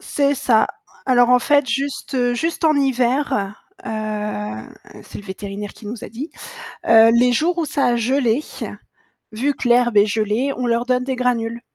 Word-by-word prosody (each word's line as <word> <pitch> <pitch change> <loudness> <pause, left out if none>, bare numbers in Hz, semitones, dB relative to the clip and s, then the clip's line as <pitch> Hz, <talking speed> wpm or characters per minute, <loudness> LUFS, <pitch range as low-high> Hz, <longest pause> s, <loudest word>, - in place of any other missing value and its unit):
C'est 285 0 0
ça. 245 -4 +2 0.4
Alors 245 -1 +4
en 250 - +6
fait 285 +2 +2
juste 260 -1 -1
juste 330 +5 -2
en 310 - +4
hiver, 260 -5 0 0.3
heu, - - -5 1.1
c'est - - -10
le 205 - -11
vétérinaire 200 +1 -7
qui 215 - -13
nous 220 +1 -7
a - - -7
dit, 260 +9 -7 0.6
heu, 225 0 +7
les 245 +1 +4
jours 335 +8 +1
où 335 - +1
ça 280 - 0
a 240 - +2
gelé, 250 +2 +1 0.9
vu 265 +7 -1
que 250 - -3
l'herbe 240 -2 +3
est 205 +1 +6
gelée, 220 +6 0
on 250 - -2
leur 235 0 0
donne 250 0 +1
des 260 0 -3
granules 235 -2 -1
245 Hz, 175 wpm, -20 LUFS, 225-275 Hz, 1.1 s, heu